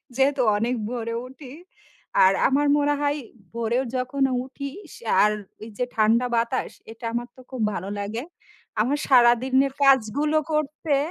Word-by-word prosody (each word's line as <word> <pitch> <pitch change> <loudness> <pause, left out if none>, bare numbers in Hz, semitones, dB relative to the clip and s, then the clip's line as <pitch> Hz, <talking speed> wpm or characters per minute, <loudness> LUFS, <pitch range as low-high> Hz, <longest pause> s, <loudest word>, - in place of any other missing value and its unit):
যেহেতু 270 0 +2 0.2
অনেক 240 +4 0
ভোরে 230 -2 -3
উঠি। 265 0 -12 0.7
আর 190 +1 +6
আমার 285 +2 +2
মনে 290 0 +2
হয় 290 +1 +1 0.4
ভোরে 235 +1 0 0.2
যখন 255 +2 -1 0.2
উঠি, 275 +1 -7 0.2
সে - - -14 0.2
আর 210 - +4 0.3
ওই 220 - -8
যে 250 - 0
ঠান্ডা 225 +3 +3
বাতাস, 230 +3 -1 0.2
এটা 230 +1 -10
আমার 240 +1 -2
তো 255 - -14
খুব 255 -3 -4
ভালো 190 +2 -5
লাগে। 220 +5 -4 0.6
আমার 275 +6 +1
সারাদিনের 260 +2 +4
কাজগুলো 275 +4 +3
করতে 305 0 0
255 Hz, 145 wpm, -24 LUFS, 230-280 Hz, 0.7 s, আর